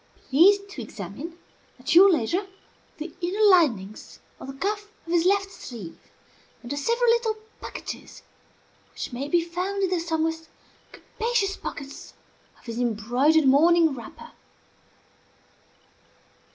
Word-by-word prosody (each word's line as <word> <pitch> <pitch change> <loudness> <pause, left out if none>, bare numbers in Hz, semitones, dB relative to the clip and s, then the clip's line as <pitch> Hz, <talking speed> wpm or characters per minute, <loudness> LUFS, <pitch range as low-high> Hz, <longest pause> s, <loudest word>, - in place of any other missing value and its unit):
Please 355 +9 +7
to 265 - -7
examine, 225 - -8 0.4
at 260 +5 -2
your 380 +3 +8
leisure, 345 - 0 0.5
the 315 +3 -7
inner 400 +5 +2
linings 230 - +1 0.2
of - - -9
the 270 - -6
cuff 410 +8 -3 0.2
of 335 - -7
his 340 -1 +3
left 390 0 +2
sleeve, 220 - -9 0.6
and 240 - -8
the - - -1
several 470 - 0
little 465 -2 +1 0.3
packages - - -8 0.7
which - - -6
may 265 +4 -4
be 335 +2 +2
found 370 +4 -3
in 380 - +2
the 360 - +1
somewhat 325 -1 -2 0.4
capacious 440 -4 -2
pockets 280 0 -8 0.4
of - - -24
his 230 0 -5
embroidered 245 +7 +2
morning 320 +3 +5
wrapper." 235 -4 -10
325 Hz, 125 wpm, -25 LUFS, 260-385 Hz, 0.7 s, your